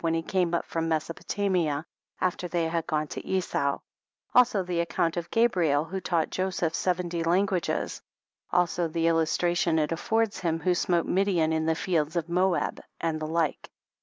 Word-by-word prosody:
when 165 -1 +1
he 165 - -1
came 175 -1 +1
from 165 0 -2
Mesopotamia 165 -1 -1 0.3
after 180 0 -1
they 170 -2 0
had 165 0 -2
gone 155 0 0
to - - -7
Esau, 160 -7 0 0.6
also 235 -6 +5
the 175 -1 -2
account 170 -1 0
of 170 -1 -4
Gabriel 175 -11 +2
who 190 +3 -5
taught 170 -3 0
Joseph 185 -3 -1
seventy 175 -1 -1
languages, 180 +1 0 0.5
also 175 -1 +2
the 165 +1 -1
illustration 165 +1 +2
it 155 0 +1
affords 220 +6 0
of - - -8
him| 165 -2 0
who 180 +1 +2
smote 175 -1 +1
Midian 180 -4 +2
in 160 0 0
the 160 - +2
fields 160 -2 0
of 170 -1 -1
Moab, 180 0 +1 0.2
and 160 -1 -1
the 155 - -3
like. 160 -2 -1
170 Hz, 165 wpm, -27 LUFS, 160-180 Hz, 0.6 s, also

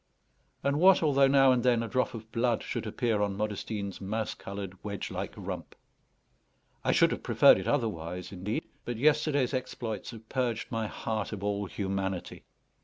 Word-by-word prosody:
And 140 +1 +1
what 185 0 +6
although 140 -3 +5
now 135 -1 +6
and 125 -1 +3
then 120 -2 +3
a - - -3
drop 125 +2 0
of 110 0 -9
blood 115 0 +1
should - - -4
appear 115 -4 0
on 100 -1 0
Modestine's 105 -1 -3
mouse 110 +3 -2
coloured 100 -2 -7
wedge 100 -2 -4
like - - -4
rump? - - -6 1.1
I - - +2
should - - +4
have - - -3
preferred - - +6
it - - -5
otherwise, 90 - -2
indeed; 100 +3 -3 0.2
but 120 -2 -4
yesterday's 145 -1 +2
exploits 120 -4 -4
had 115 -2 -10
purged 120 -3 -2
my 115 -2 -1
heart 110 -1 -3
of 100 -2 -6
all 100 0 -1
humanity. 95 -2 -3
110 Hz, 170 wpm, -29 LUFS, 100-125 Hz, 1.1 s, what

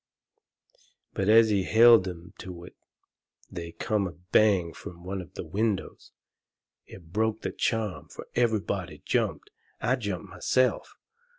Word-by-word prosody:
But 95 +1 -1
as 110 0 +7
he 100 -2 +2
held 115 0 +6
'em 90 0 -8
to 90 -2 -8
it 90 - -13 0.8
they 85 -1 -7
come 105 +2 -1
a 85 - -8
bang 90 -1 +2
from 85 0 -11
one 95 +1 -4
of 90 - -14
the - - -5
windows. 100 +3 -2 0.8
It 85 -3 -14
broke 110 +1 0
the - - -2
charm. 110 -4 -2
Fur - - -10
everybody 110 -4 -1
jumped. - - -1 0.3
I 130 +2 +1
jumped 100 -8 -4
myself. 130 0 0
100 Hz, 135 wpm, -27 LUFS, 90-110 Hz, 0.8 s, as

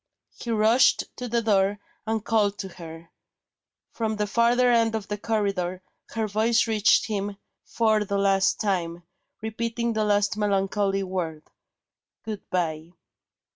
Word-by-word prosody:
He 235 - -8
rushed 225 +3 +4
to 250 - -5
the 235 0 0
door, 200 -2 +2 0.3
and 220 -1 -1
called 205 -3 +1
to 195 - -5
her. 165 -2 -11 0.8
From 220 -1 -2
the 210 0 -1
farther 235 +4 +3
end 230 -1 +3
of 215 -3 -4
the 210 - -3
corridor, 195 -5 -1 0.3
her 220 -1 0
voice 220 +3 +2
reached 215 -2 +3
him 205 -2 -3 0.3
for 220 -2 +1
the 200 0 -2
last 195 -1 +2
time, 175 -4 -1 0.4
repeating 230 +1 -2
the 215 -1 0
last 205 0 +1
melancholy 195 -1 0
word: 170 -5 -4 0.8
"Good 215 -2 -6
bye." 165 -2 -2
210 Hz, 135 wpm, -25 LUFS, 195-225 Hz, 0.8 s, rushed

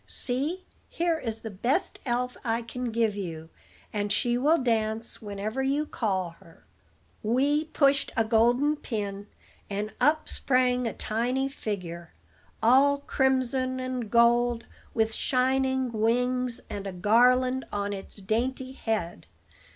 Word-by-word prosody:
See, 290 +9 -2 0.2
here 335 -1 0
is 225 -4 -3
the 225 - -6
best 240 - 0
elf 250 +1 -1
I 230 0 0
can 250 +2 -5
give 225 -2 +1
you, 165 -5 -6 0.4
and 205 -1 -1
she 240 +3 +2
will 295 +7 +3
dance 225 -3 0
whenever 210 +4 -3
you 280 +3 +1
call 190 - -1
her." 165 - -19 0.6
Wee 280 +7 +2
pushed 280 -3 +2
a 225 - +4
golden 240 +7 +3
pin, 205 -5 -4 0.4
and 205 +1 -3
up 310 +1 +3
sprang 250 -2 +1
a - - -3
tiny 250 +5 -1
figure, 175 - -6 0.5
all 270 +5 +5
crimson 260 -1 +1
and 255 -3 -3
gold, 235 0 +3 0.3
with 220 -1 +1
shining 260 +1 +1
wings, 245 +2 0
and 200 -1 -5
a - - -3
garland 250 +7 +3
on 205 0 -2
its 195 -1 -6
dainty 240 +6 -2
head. 220 -9 -3
240 Hz, 130 wpm, -27 LUFS, 215-260 Hz, 0.6 s, all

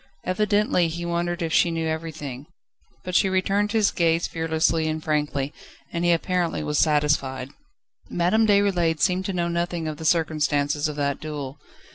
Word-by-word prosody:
Evidently 205 -2 +2
he 170 +1 -5
wondered 175 +1 -1
if 160 - -2
she 175 - +4
knew 165 -1 -2
everything: 160 -4 -5 0.6
but 180 - -5
she 190 - +4
returned 195 +2 +1
his 215 -2 +3
gaze 165 -1 +1
fearlessly 160 0 0
and 155 0 -3
frankly, 150 -2 -1 0.4
and 170 0 -1
he 175 - +4
apparently 170 -1 0
was 150 0 0
satisfied. 145 -4 +1 0.6
Madame 200 +6 +2
Déroulède 190 -6 +2
seemed 185 +4 +1
to 195 - -1
know 175 -1 0
nothing 170 -1 -2
of 155 -1 -4
the 160 - -8
circumstances 155 -3 +1
of 150 - -5
that 140 -1 -1
duel. 145 -3 -6
165 Hz, 160 wpm, -24 LUFS, 150-175 Hz, 0.6 s, she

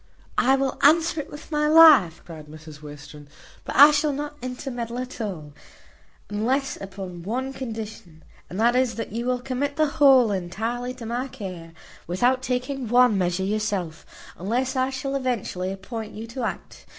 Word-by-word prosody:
"I 265 +2 +4
will 270 -1 -2
answer 320 +1 +4
it - - -12
with 295 +2 -11
my 300 0 +1
life," 305 - +7
cried 155 -3 -10
Mrs 155 -1 -12
Western, 145 0 -11 0.4
"but - - -6
I 285 +4 +9
shall 295 0 +1
not 295 +1 -5
intermeddle 245 -2 -5
at 255 -1 -6
all, 160 -9 -5 0.7
unless 250 +7 -1
upon 190 -3 -8
one 255 +8 -3
condition, 220 -10 -8 0.3
and 185 - -6
that 235 +2 +3
is, 255 -2 +1
that 225 -3 -5
you 235 +3 -3
will 250 0 0
commit 265 +3 -3
the 310 0 +3 0.2
whole 260 -6 +7
entirely 225 +7 -3
to 245 -2 -9
my 240 +4 -3
care, 185 -10 -8 0.3
without 245 +9 +1
taking 255 +1 -2
any 255 - -4
one 245 -1 +4
measure 180 0 0
yourself, 200 -5 -2 0.4
unless 250 +8 -1
I 260 0 +1
shall 270 +1 -4
eventually 230 -8 -2
appoint 215 +3 -7
you 220 +2 -6
to 235 +2 -5
act. - - -7
240 Hz, 170 wpm, -24 LUFS, 190-265 Hz, 0.7 s, I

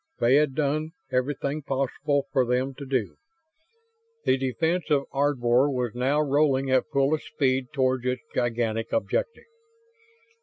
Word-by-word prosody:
They 120 +2 +3
had 145 -2 +3
done 155 +2 -1 0.2
everything 140 +3 -1
possible 140 +1 -1
for 130 - +4
them 125 +2 0
to 140 +1 -9
do. 115 - -1 1.1
The - - +4
defense 160 +7 -1
of 145 -2 +3
Ardvor 135 -1 +2
was 125 -3 -1
now 135 +5 +1
rolling 140 -2 +2
at 130 -1 +2
fullest 140 +3 +1
speed 130 -2 0
toward 130 -3 +1
its 125 +1 -2
gigantic 115 -2 -1
objective. 465 - -1
135 Hz, 130 wpm, -26 LUFS, 125-145 Hz, 1.1 s, for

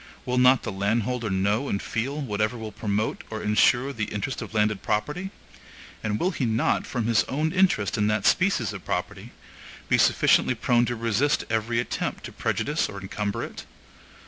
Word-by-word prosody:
Will 125 0 +1
not 125 +1 +5
the - - -3
landholder 110 +4 -1
know 100 +8 0
and 100 - 0
feel 130 +9 -3
whatever 110 -2 -1
will 110 -1 -6
promote 105 +1 -2
or 110 -1 -5
insure 120 +6 +3
the 110 -4 -2
interest 105 +6 -4
of - - -7
landed 105 -2 +1
property? 150 - -2 0.7
And 105 -1 -1
will 185 - +1
he 150 - -3
not, 115 0 +1
from 120 -4 -2
his 115 -1 +3
own 155 +4 -1
interest 180 - +2
in 105 - +2
that 105 -1 0
species 175 - +2
of - - -8
property, - - -4 0.6
be - - +4
sufficiently 130 - +4
prone 120 +1 +2
to 120 - -2
resist 115 +5 +1
every 115 +1 0
attempt 120 - -3
to - - -7
prejudice - - -1
or 100 - -7
encumber 100 +1 -3
it? - - -8
115 Hz, 175 wpm, -25 LUFS, 105-125 Hz, 0.7 s, not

